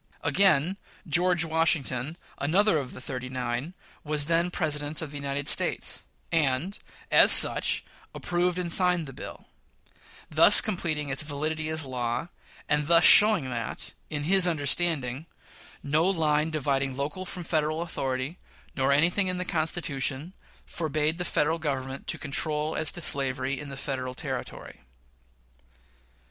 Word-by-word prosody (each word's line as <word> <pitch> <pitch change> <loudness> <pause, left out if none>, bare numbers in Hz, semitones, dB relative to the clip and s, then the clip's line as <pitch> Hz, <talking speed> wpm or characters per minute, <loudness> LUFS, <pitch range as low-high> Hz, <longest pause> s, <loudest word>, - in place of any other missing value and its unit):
Again: 190 -1 +2 0.3
George 175 +1 +2
Washington, 160 -3 -1 0.2
another 175 +4 +1
of 130 -3 -8
the - - -10
"thirty 130 -1 -6
nine," 125 +6 -5 0.3
was 150 -1 +1
then 170 +2 0
President 150 -3 -2
of 160 -4 -5
the 145 - -7
United 140 0 -4
States, - - +1 0.3
and, 160 +4 -1 0.3
as - - +7
such, - - +6 0.3
approved 175 0 -2
and 175 -2 -3
signed 180 -2 +2
the 135 - -10
bill; - - -10 0.8
thus 160 +7 +7
completing 155 -8 -2
its 135 +2 -1
validity 155 +1 -4
as 160 0 0
a - - -10
law, 125 +4 -4 0.4
and 150 0 -1
thus 170 0 +5
showing 210 -9 +7
that, 115 -2 -5 0.2
in 150 -2 -4
his 185 +3 +3
understanding, 155 -3 0 0.6
no 150 +3 0
line 155 -4 0
dividing 140 -3 -2
local 150 +7 -4
from 180 -1 -7
Federal 155 0 -2
authority, 135 0 -5 0.4
nor 135 +1 0
anything 175 +7 +1
in 180 0 -2
the 180 - -4
Constitution, 155 -2 -2 0.3
forbade 155 0 -2
the - - -2
Federal 160 0 -1
Government 135 -3 -5
to - - -1
control 150 +2 -2
as 155 -2 +2
to 175 - -5
slavery 130 -2 0
in 145 -2 -9
Federal 130 -2 -5
territory. - - -7
155 Hz, 140 wpm, -26 LUFS, 140-170 Hz, 0.8 s, as